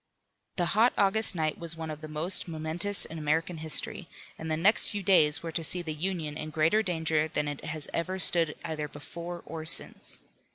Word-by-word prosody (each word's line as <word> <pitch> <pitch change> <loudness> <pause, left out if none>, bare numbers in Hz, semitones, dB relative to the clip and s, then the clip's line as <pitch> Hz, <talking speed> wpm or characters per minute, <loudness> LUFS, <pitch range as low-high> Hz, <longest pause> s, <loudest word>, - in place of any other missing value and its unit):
The 175 - +1
hot 225 +4 +4
August 200 0 +2
night 155 -2 -1
was 165 -1 -3
one 160 -1 -5
of 155 0 -8
the 155 - -7
most 155 +6 0
momentous 165 +5 +1
in 160 0 -8
American 160 +3 0
history, 160 -1 -1 0.3
and 160 - -7
the 155 - 0
next 200 +7 +3
few 205 -1 -3
days 160 -6 +4
were 165 - -4
to 165 - -1
see 175 +3 +4
the 160 -2 -4
Union 155 -2 -3
in 155 0 -5
greater 160 +7 +2
danger 160 -5 0
than 150 -1 -1
it 145 -1 -5
has 155 -1 -2
ever 185 +3 -2
stood 170 -4 +3
either 155 -2 -3
before 170 +4 -8
or 160 -1 -6
since. 160 - +1
160 Hz, 200 wpm, -29 LUFS, 155-180 Hz, 0.3 s, hot